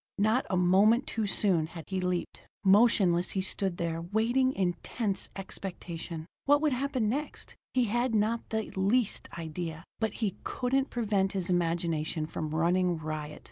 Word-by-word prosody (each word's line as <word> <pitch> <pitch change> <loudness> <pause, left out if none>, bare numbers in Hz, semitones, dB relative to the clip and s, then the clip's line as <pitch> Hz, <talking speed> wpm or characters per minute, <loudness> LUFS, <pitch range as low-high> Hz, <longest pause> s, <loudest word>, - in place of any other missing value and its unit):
Not 215 +6 +2
a 185 - +1
moment 200 +8 +4
too 220 -2 -2
soon 185 -6 +2
had 165 -1 -9
he 190 -1 -1
leaped. 180 -1 -3 0.2
Motionless 190 -4 +4
he - - +2
stood 190 -1 -1
there, 165 -1 -2
waiting 230 +8 +2
in 185 -7 0
tense 200 -5 -2
expectation. 175 -4 -6 0.2
What 290 +1 +5
would 305 -1 +2
happen 255 -3 0
next, 285 +7 -3 0.2
he 255 - +4
had 240 +2 0
not 220 +2 0
the 220 -1 -2
least 200 +4 +1
idea, 165 0 -5 0.2
but 220 -2 0
he 210 -5 -2
couldn't 265 +2 0
prevent 205 -5 0
his 185 -2 -1
imagination 165 -2 0
from 155 0 -4
running 175 +2 +2
riot. 155 -1 -5
190 Hz, 155 wpm, -30 LUFS, 170-225 Hz, 0.2 s, What